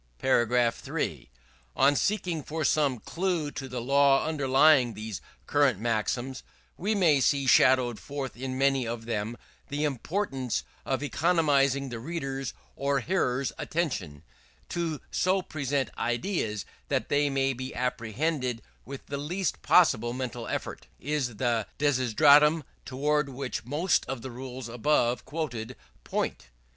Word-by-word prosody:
§ 120 0 +3
3. - - -3 0.5
On 140 +2 +4
seeking 180 -3 0
for 155 +2 -3
some 140 -5 +2
clue 165 - -2
to 135 -2 -6
the 125 0 -4
law 140 +3 +4
underlying 135 -4 +4
these 110 -1 -6 0.2
current 140 -8 +2
maxims, 120 +3 -1 0.3
we 210 +5 -1
may 160 -8 +4
see 140 +1 +2
shadowed 130 -3 +4
forth 140 -3 -5
in 130 +1 -4
many 135 -2 +2
of 115 -1 -5
them, 115 0 -3 0.3
the 145 +2 -2
importance 135 - -2 0.2
of 135 +1 -1
economizing 140 -4 +2
the 120 -2 -5
reader's 135 -2 -4 0.2
or 140 0 0
hearer's 130 - 0
attention, 105 - -3 0.5
To 165 -4 -2
so 185 +1 +1
present 140 -5 -2
ideas 120 - -2 0.2
that - - -1
they 145 0 +2
may 135 0 +1
be 130 +1 -6
apprehended 125 +1 -2 0.2
with 135 +1 -9
the 140 0 -4
least 180 +6 -2
possible 120 -10 +4
mental 125 -2 -4
effort, - - -5
is 135 -4 -2
the 115 -2 0
desideratum 145 +3 +5 0.2
towards 145 +2 0
which 135 -3 -5
most 150 +8 +1
of 130 -3 -5
the 130 - -6
rules 130 0 -7
above 120 0 +1
quoted 125 -7 -4 0.3
point. - - -3
135 Hz, 130 wpm, -28 LUFS, 120-150 Hz, 0.5 s, desideratum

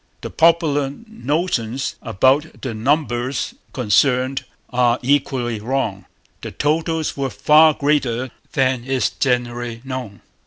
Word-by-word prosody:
The - - -6
popular 160 -4 +3 0.2
notions 145 - -2
about 130 +7 +1
the 130 -4 -3
numbers 125 0 -1 0.2
concerned 125 +3 +1 0.3
are 120 -1 +3
equally 130 -4 0
wrong. 110 -4 -2 0.4
The - - -5
totals 160 +1 -1
were 135 -1 -2
far 155 +3 +5
greater 130 -4 0 0.2
than 130 -2 +1
is 130 0 0
generally 120 -2 -1
known. 130 -6 -6
130 Hz, 110 wpm, -20 LUFS, 120-145 Hz, 0.4 s, far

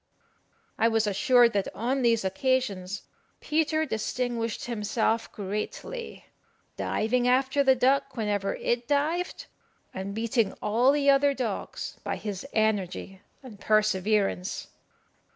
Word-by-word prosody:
I 225 - +5
was 225 -1 +2
assured 235 +4 +4
that 200 -1 0
on 255 +5 -1
these 230 -4 +2
occasions 200 -3 -1 0.4
Peter 315 0 +1
distinguished 230 -2 -2
himself 225 0 -1
greatly, 210 - -5 0.5
diving 245 +3 0
after 265 +2 +3
the 265 -1 +5
duck 265 +1 +1
whenever 205 -3 -1
it 240 0 -1
dived, 310 +5 0 0.5
and 195 +1 -5
beating 225 -2 0
all 240 +5 +2
the 280 -1 +4
other 280 0 +3
dogs 235 -6 -4
by - - -2
his 205 +2 -5
energy 200 -3 -1 0.2
and 225 -6 -11
perseverance. 210 -3 +1
230 Hz, 115 wpm, -27 LUFS, 210-265 Hz, 0.5 s, I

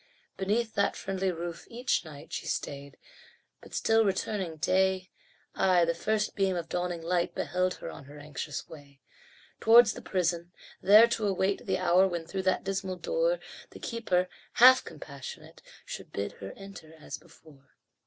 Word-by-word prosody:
Beneath 220 +4 0
that 200 0 +1
friendly 190 -1 -2
roof, 170 0 -6
each 245 +2 0
night 150 -4 -11
She - - -4
stayed, 140 0 -4 0.6
but - - -11
still 225 0 +3
returning 195 -3 -1
day 185 +2 +1 0.4
Ay, 180 -2 +4
the 170 - +1
first 210 +5 -1
beam 195 -2 +1
of 170 -2 -3
dawning 175 -1 -3
light 175 +1 0
Beheld 180 +4 0
her - - -7
on 140 - -11
her 145 +2 -12
anxious 145 0 -6
way. 140 -3 -14 0.6
Towards 225 0 +7
the - - -9
prison, 175 -2 -1 0.3
there 210 +4 +8
to 220 -2 0
await 195 +1 0
The 190 -1 +1
hour 185 +1 +4
when 170 -3 -4
through 190 +3 -3
that - - 0
dismal 195 -1 -2
door - - 0 0.3
The - - -12
keeper, 185 -6 0 0.3
half 255 +2 +8
compassionate, 140 -3 -10 0.2
Should - - -8
bid 100 0 -3
her 95 0 -7
enter 195 -5 -12
as - - -7
before. 155 -5 -20
185 Hz, 160 wpm, -29 LUFS, 165-200 Hz, 0.6 s, there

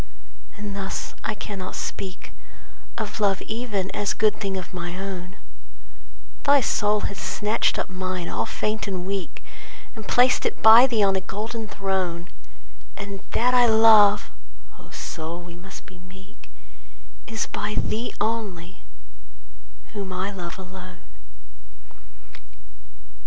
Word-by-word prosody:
And 205 -1 -5
thus, 195 -1 -4
I 215 - -1
cannot 195 -3 -6
speak 185 -1 -5 0.7
Of 220 0 -4
love 200 -2 +3
even, 215 -5 -2
as 205 - 0
good 215 -1 +3
thing 195 -2 -1
of 185 - -7
my 175 0 -4
own: 190 0 -6 1.1
Thy 285 0 +6
soul 210 -4 +2
hath 195 -4 -3
snatched 210 +5 +1
up - - -1
mine 185 -2 -3
all 110 - -1
faint 215 0 -2
and 185 -2 -3
weak, 195 -2 -4 0.5
And 220 -3 -9
placed 250 +1 +4
it - - -2
by 225 +4 +10
thee 225 -5 +2
on 195 -1 +4
a 190 - +1
golden 220 +3 -4
throne, 185 -4 -2 0.7
And 200 -1 -6
that 250 +2 +3
I 245 -1 +6
love 220 -2 +6 0.5
(O - - -15
soul, 165 +2 -5
we 175 -1 -10
must 190 +2 -11
be 185 -3 -14
meek 190 +4 -16 0.4
) - - -26
Is 225 -1 -2
by 210 - -3
thee 230 +3 -1
only, 190 -6 -3 1.1
whom 195 -2 -4
I 185 +2 -2
love 175 -3 -6
alone. 185 -1 -10
195 Hz, 135 wpm, -25 LUFS, 185-215 Hz, 1.1 s, by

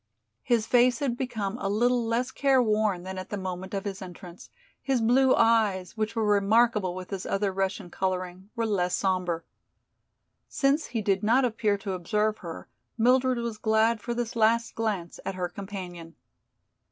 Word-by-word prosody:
His 235 -3 +1
face 245 +1 +4
had 275 -5 -1
become 235 -4 -3
a 195 - -2
little 240 +4 +2
less 235 +3 -1
careworn 220 -9 +2
than 190 0 -5
at 185 - -8
the 205 - -3
moment 190 0 -5
of 195 - -3
his 200 -1 -5
entrance; 180 -1 -10 0.3
his 270 -2 +1
blue 255 +3 +4
eyes, 215 -6 +2
which 220 +1 -2
were 225 -1 +1
remarkable 210 -1 +3
with 185 +1 -8
his 195 -2 -4
other 195 0 0
Russian 190 -2 -2
coloring, 185 0 -3
were 230 -1 0
less 180 -5 0
sombre. 180 -3 -1 1.0
Since 280 +3 +1
he 230 -2 -3
did 195 -1 +1
not 245 +5 +3
appear 220 -3 0
to 195 -1 -4
observe 210 +4 0
her, 170 -3 -8 0.3
Mildred 255 +2 +3
was 235 -2 -4
glad 220 +1 +2
for 235 +2 -3
this 235 -1 -3
last 230 +1 +2
glance 205 -7 -3
at 195 - -4
her 180 -1 -2
companion. 175 -3 -8
210 Hz, 165 wpm, -27 LUFS, 190-235 Hz, 1.0 s, face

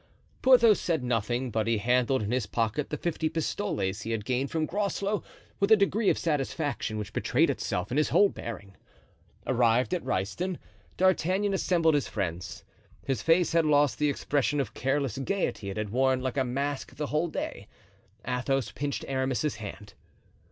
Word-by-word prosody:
Porthos 235 -5 +6
said 160 -6 0
nothing, 120 +1 -1
but 110 0 0
he 115 -1 +2
handled 125 +3 +2
in 105 - -3
his 125 -4 0
pocket 115 +5 -1
the 150 - -3
fifty 160 -1 -1
pistoles 155 - -2
he 110 - -6
had 110 -2 -2
gained 130 +2 0
from 160 -1 0
Groslow 200 +3 -1 0.4
with 200 +2 +1
a - - +10
degree 200 +1 +2
of - - +2
satisfaction 145 -6 -2
which 105 0 -5
betrayed - - +2
itself 90 +4 -3
in 130 - 0
his 150 - +2
whole 205 - +5
bearing. 100 - -8 0.7
Arrived 125 +3 +2
at 180 - -1
Ryston, 170 - -2 0.4
D'Artagnan 190 +2 +2
assembled 170 -4 +2
his 145 -2 +1
friends. 90 -4 -4 0.4
His 130 -6 -1
face 165 +2 +3
had 165 0 +3
lost 145 -3 +3
the 150 -1 +3
expression 145 +1 0
of 135 - -2
careless 135 -2 -1
gayety 135 - -2
it 95 - -5
had 105 -1 -3
worn 130 +2 +2
like 130 +1 -3
a 135 - +3
mask 140 +2 -3
the 150 - -3
whole 150 +4 0
day. 100 -10 -5 0.6
Athos 125 -2 -1
pinched 140 +3 -3
Aramis's 130 +2 -1
hand. 105 -1 -8
135 Hz, 170 wpm, -28 LUFS, 115-165 Hz, 0.7 s, a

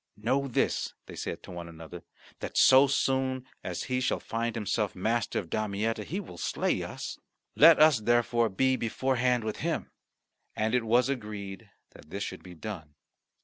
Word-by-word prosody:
"Know 130 +6 0
this," 125 - 0
they - - -10
said - - -5
one 85 -1 -7
to - - -10
another, 85 +1 -10 0.4
"that - - -5
so 135 +2 +7
soon 130 -1 0 0.2
as 90 -2 -4
he 130 0 -1
shall 130 - 0
find 115 0 -3
himself 105 -1 -1
master 115 +5 0
of 85 - -4
Damietta, 110 +1 -1
he 185 - -3
will 90 - -9
slay - - 0
us. - - -6 0.4
Let 160 +2 +8
us 155 -5 +6
therefore 120 +1 +2
be 130 +7 +2
beforehand 125 +1 0
with 110 -1 -3
him." - - -2 0.6
And 110 +2 0
it 125 -2 +2
was 120 +3 +3
agreed 105 -5 -5 0.2
that 75 - -16
this 100 +4 -4
should - - -6
be 90 -1 -12
done. 80 -5 -7
115 Hz, 170 wpm, -29 LUFS, 100-130 Hz, 0.6 s, Let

